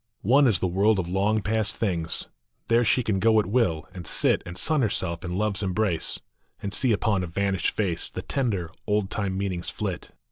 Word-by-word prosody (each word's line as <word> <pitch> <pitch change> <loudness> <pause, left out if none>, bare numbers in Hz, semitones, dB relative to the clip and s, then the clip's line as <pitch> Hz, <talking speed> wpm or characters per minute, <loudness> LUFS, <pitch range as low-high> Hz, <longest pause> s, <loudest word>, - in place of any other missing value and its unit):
One 135 +6 +5
is 110 -6 +3
the 95 - 0
world 100 +4 +3
of 90 -3 -2
long 100 +4 +1
past 110 0 0
things; 85 -6 -1 0.4
There 115 +1 +4
she 125 +2 +3
can 105 -4 0
go 110 +2 +4
at 105 - +1
will, 95 -7 +1
and 90 -3 -8
sit - - +3
And 90 +1 -7
sun 155 - +2
herself 90 -7 -1
in 90 0 -3
love 105 -1 0
s - - 0
embrace, 95 -3 0 0.4
And 100 - -5
see 130 +1 +2
upon 105 -2 +1
a - - -3
vanished 95 +2 0
face 90 -6 -2
The - - -6
tender, 100 -11 -1 0.2
old 105 -2 0
time 100 -3 -2
meanings 95 -3 -2
flit. - - -4
100 Hz, 205 wpm, -26 LUFS, 90-110 Hz, 0.4 s, One